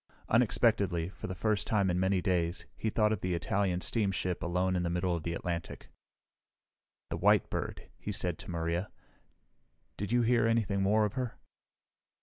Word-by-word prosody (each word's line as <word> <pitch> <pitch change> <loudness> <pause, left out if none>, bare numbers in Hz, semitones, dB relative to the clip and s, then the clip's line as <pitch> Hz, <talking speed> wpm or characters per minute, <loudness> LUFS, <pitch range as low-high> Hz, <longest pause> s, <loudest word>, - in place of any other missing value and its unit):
Unexpectedly, 105 -7 +2
for - - -8
the 95 - -4
first 105 +3 0
time 100 -4 +2
in 90 - 0
many 95 -1 +1
days, 85 -1 0
he 110 - -1
thought 105 0 +2
of 105 - -3
the 90 -1 0
Italian 90 +1 0
steamship 95 -5 0
alone 90 +2 0
in 90 - +1
the 85 - -1
middle 90 +1 0
of 85 - -3
the 85 +1 -3
Atlantic. 85 -1 -5 1.2
"The - - -1
White - - +3
Bird," - - -4
he 105 - -4
said 90 -4 -2
to - - -10
Maria. 85 +2 -1 1.1
"Did 100 +2 -4
you 120 0 +3
hear 115 -1 +3
anything 105 -4 +1
more 105 +2 +3
of 105 - -3
her?" 125 -3 -3
95 Hz, 170 wpm, -31 LUFS, 90-105 Hz, 1.2 s, White